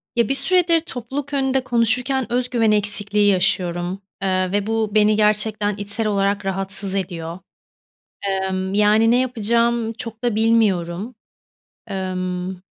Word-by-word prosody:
Ya, 235 -3 +2
bir 275 - +1
süredir 350 +1 +4
topluluk 280 -1 -6
önünde 265 -1 +1
konuşurken 245 +2 0
öz 250 0 0
güven 225 -3 +2
eksikliği 205 0 +1
yaşıyorum, 180 -1 0 0.2
ııı, 185 -1 0
ve 205 +1 -1
bu 220 -1 0
beni 215 0 +4
gerçekten 210 0 +1
içsel 205 +2 -2
olarak 200 0 0
rahatsız 195 0 -2
ediyor. 170 -3 -4 1.1
Imm, 190 +1 -3
yani, 210 +2 +4
ne 245 - +4
yapacağımı 235 -1 0
çok 230 0 -8
da 240 -3 +1
bilmiyorum. 215 -2 +1 0.8
Imm 185 -1 -3
210 Hz, 125 wpm, -21 LUFS, 195-235 Hz, 1.1 s, süredir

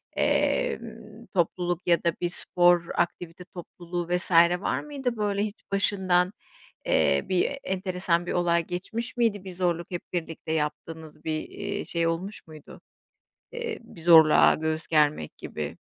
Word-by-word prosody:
emm, 230 - -1
topluluk 175 0 -1
ya 170 -1 +3
da 170 - +2
bir 175 - 0
spor 175 0 +3
aktivite 175 0 -2
topluluğu 175 -1 -7
vs. 180 - -5 0.3
var - - -1
mıydı? 270 -6 -4
Böyle 205 -1 0
hiç 210 0 -5
başından, 190 -2 +2 0.5
eee, - - +2
bir 185 +10 +1
enteresan 180 -2 -1
bir - - -3
olay 170 -1 +2
geçmiş 225 +9 -5
miydi, 210 -5 +1
bir 190 - -7
zorluk 175 -1 -1
hep 175 - -3
birlikte 165 -2 -4
yaptığınız 155 0 -4
bir, 160 - -1 0.2
iii, - - -5
şey 170 -1 -1
olmuş 185 +5 -3
muydu? 155 -1 -13 0.7
Eee, 475 -2 -4
bir 185 -7 -14
zorluğa 160 -2 +7
göğüs 160 0 -2
germek 150 - +1
gibi. - - -6
175 Hz, 140 wpm, -26 LUFS, 165-200 Hz, 0.7 s, zorluğa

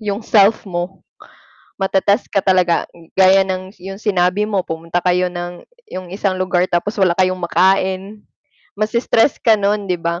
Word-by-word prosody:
yung 205 -1 -3
self 210 +1 +3
mo. 175 +1 -5 0.8
Matetest 195 +1 +1
ka 200 - +2
talaga, 185 -2 +2 0.3
gaya 190 0 +6
ng 185 0 -5
'yong 195 +2 -9
sinabi 190 -1 +1
mo 195 -4 -1
pumunta 165 +2 -3
kayo 180 0 +2
ng 175 0 -7 0.3
'yong 185 -1 -6
isang 195 -1 -1
lugar 180 -1 +1
tapos 180 +5 -1
wala 185 -3 +4
kayong 185 0 +2
makain, 190 +3 0 0.5
mase-stress 225 +4 +1
ka 225 - +4
no'n 205 +1 0
'di 180 - +1
ba? 170 +1 -2
190 Hz, 155 wpm, -18 LUFS, 180-200 Hz, 0.8 s, gaya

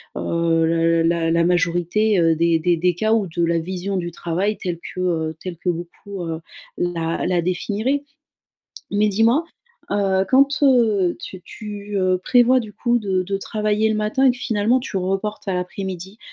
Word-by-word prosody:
heu, 165 -1 +1
l 165 0 +2
la 165 -1 +1
la 170 0 +3
majorité, 180 +4 +1
heu, 165 -1 +3
des 165 0 +2
des 170 +1 +2
des 180 +1 +2
cas 220 +4 0
ou 210 -4 +1
de 170 +1 -2
la 170 0 +2
vision 185 +3 -3
du 175 -1 -3
travail 180 +6 -2
telle 175 -2 -3
que, 185 - -7
heu, 160 -3 -1
telle 180 -3 -6
que 180 - -2
beaucoup, 175 +3 -5
heu, 165 -1 -4 0.4
la 165 -2 -1
la 175 -1 +1
définiraient. 215 - -1 0.9
Mais 210 +1 +3
dis-moi, 225 - +3 0.5
heu, 195 -1 +1
quand, 275 +2 +4
heu, 220 -9 +3
tu 190 - -8
tu, 205 -1 -7
heu, 185 -1 +2
prévois, 250 +3 +4
du 215 -2 -8
coup, 240 +2 +1
de 190 -4 0
de 195 +1 -2
travailler 215 +1 0
le 215 - 0
matin 215 +6 +1
et - - +7
que 245 - -3
finalement, 225 +1 +1
tu 220 - -5
reportes 195 +3 -3
à 185 - 0
l'après-midi, 190 +2 -5
190 Hz, 180 wpm, -21 LUFS, 170-215 Hz, 0.9 s, et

